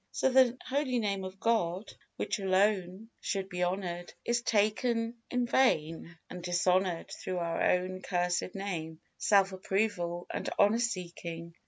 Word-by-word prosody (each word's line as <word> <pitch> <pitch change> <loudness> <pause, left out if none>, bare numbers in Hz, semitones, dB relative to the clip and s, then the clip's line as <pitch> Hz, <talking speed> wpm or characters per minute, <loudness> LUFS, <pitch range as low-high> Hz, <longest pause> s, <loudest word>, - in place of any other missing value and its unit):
So 265 - +1
the 255 -1 +5
holy 265 -1 0
Name 200 -4 -1
of 190 +1 -7
God, 195 -4 0 0.2
which - - -2
alone 195 +1 +1
should 195 -1 -2
be 180 -1 -4
honored, 175 -1 -2
is 240 0 +1
taken 230 +2 +1
in 250 -1 +1
vain 170 -9 +1
and 180 - -8
dishonored 180 0 +1
through 185 - -4
our 170 -1 -1
own 185 +1 +1
cursed 180 0 -1
name, 165 -5 -4 0.2
self 195 -2 +4
approval 185 -2 -1
and - - -2
honor 205 +3 +4
seeking. 170 -6 -4
190 Hz, 140 wpm, -31 LUFS, 175-225 Hz, 0.2 s, the